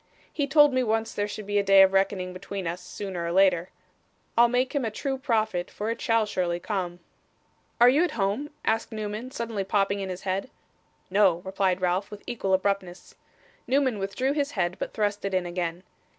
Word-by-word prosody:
He 285 -2 -1
told 295 0 +6
me 255 - +2
once 225 -1 0
there 205 0 -1
should 210 0 -7
be 205 0 +1
a - - +1
day 195 0 +7
of 190 0 +3
reckoning 190 -1 +1
between 190 +1 -6
us, 170 +2 -3
sooner 180 -1 -5
or 170 - -2
later. 185 -1 +3 0.7
I'll 235 +1 +6
make 250 +2 0
him 285 -3 0
a 225 - 0
true 270 +5 -3
prophet, 220 -9 0
for 215 +2 -3
it 230 - -5
shall 230 -1 +2
surely 180 -4 -1
come.' 180 -3 -3 0.8
'Are 240 - +8
you 280 +7 +5
at 355 - -1
home?' 205 +9 -1 0.2
asked 225 +2 0
Newman, 215 +2 -4
suddenly 230 -5 -3
popping 200 0 +1
in 195 -1 -4
his 185 0 -6
head. 195 +5 -2 0.6
'No,' 190 -3 +3
replied 190 -1 0
Ralph, 185 +2 0
with 210 - -10
equal 195 -5 0
abruptness. 190 -2 -2 0.5
Newman 260 -5 +1
withdrew 200 +8 -1
his 285 -1 -1
head, 180 -2 0
but - - -3
thrust 205 -1 -1
it 195 -1 -1
in 185 -1 +1
again. 175 0 -3
200 Hz, 195 wpm, -26 LUFS, 185-230 Hz, 0.8 s, Are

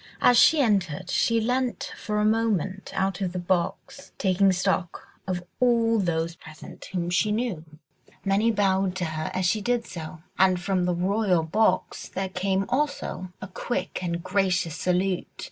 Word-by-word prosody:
As 245 - +5
she 300 +5 +6
entered, 185 - 0
she 230 -1 +2
leant 250 +2 -1
for 210 -1 -3
a 210 - +2
moment 210 -4 0
out 190 0 -1
of 180 -2 -1
the - - -3
box, 180 +1 -2
taking 195 0 +3
stock 185 -1 -1 0.2
of 180 -2 -2 0.2
all 230 -2 +3
those 170 -3 0
present 155 -2 -12
whom 175 -2 -3
she 210 +4 +2
knew. 215 -7 -2 0.6
Many 200 +4 +3
bowed 195 -3 +1
to 185 -2 -2
her 155 -1 -3
as 185 0 0
she 210 +4 +1
did 240 +1 0
so, 160 -2 -8 0.2
and 185 -1 +4
from 185 0 0
the 180 -1 +1
royal 185 -1 +1
box 185 +3 0
there 190 0 -3
came 190 +1 0
also 260 -9 -2
a - - -5
quick 220 +5 -3
and 170 -1 -3
gracious 185 -4 0
salute. 180 0 0
190 Hz, 160 wpm, -26 LUFS, 180-215 Hz, 0.6 s, she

